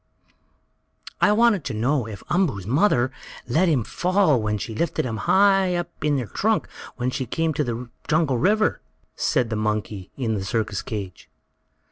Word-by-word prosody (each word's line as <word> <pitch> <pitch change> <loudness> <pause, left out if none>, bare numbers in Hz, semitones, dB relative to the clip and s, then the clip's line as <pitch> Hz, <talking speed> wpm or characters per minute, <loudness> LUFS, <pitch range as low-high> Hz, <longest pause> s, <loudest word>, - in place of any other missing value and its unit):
"I - - +5
wanted 215 -5 +3
to 130 - -3
know 125 +2 0
if 105 -2 -8
Umboo's 155 - 0
mother 130 - +2 0.4
let 165 +9 +2
him 135 -8 +2
fall 180 - +2
when 105 0 -1
she 110 +3 -5
lifted 160 +4 -1
him 115 -3 -3
high 195 -2 +4
up 175 0 -3
in 150 -1 +2
her 125 - -2
trunk - - 0 0.3
when 125 +1 -1
they 130 -1 -3
came 160 +6 0
to 150 - 0
the 120 -1 -4 0.2
jungle 155 -5 +2
river," 215 - +2 0.3
said 125 -6 0
the - - 0
monkey 105 -3 -2
in 120 -5 -1
the 100 -3 -2
circus 110 -1 -1
cage. 100 -4 -7
130 Hz, 165 wpm, -23 LUFS, 110-175 Hz, 0.4 s, I